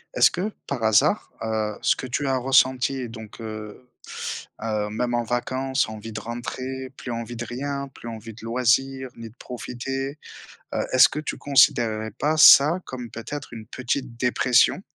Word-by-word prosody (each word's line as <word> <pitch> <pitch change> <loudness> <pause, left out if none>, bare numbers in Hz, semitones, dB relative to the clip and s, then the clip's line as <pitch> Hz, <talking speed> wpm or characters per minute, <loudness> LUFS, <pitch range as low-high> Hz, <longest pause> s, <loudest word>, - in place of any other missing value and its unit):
Est-ce - - +6
que 190 +5 -2 0.2
par 130 -5 -3
hasard, 110 -2 +3
heu, 110 -1 -1
ce - - +3
que 130 - -6
tu 140 +3 -1
as 130 -1 +2
ressenti 130 0 +2
donc 110 0 -10
heu 110 +1 -7 0.8
heu, 105 -2 -1
même 120 +3 -2
en 120 - +2
vacances, 130 +2 -1
envie 110 +1 -8
de 105 - -5
rentrer, 130 +3 -5
plus 125 - -6
envie 115 0 -5
de 120 +1 -5
rien, 140 +3 -4
plus 120 - -9
envie 115 0 -8
de 110 - -14
loisir, 130 +3 +1
ni 115 -1 -9
de 110 - -22
profiter, 135 +4 -5 0.6
heu, - - 0
est-ce 130 - +8
que 150 - -4
tu 155 - -4
considérerais 120 -5 +3
pas 150 +9 0
ça 155 +2 +8
comme, 125 -2 -7
peut-être, 130 +4 -7
une 110 -1 -9
petite 130 0 -3
dépression? 125 +6 +3
120 Hz, 170 wpm, -24 LUFS, 115-135 Hz, 0.8 s, est-ce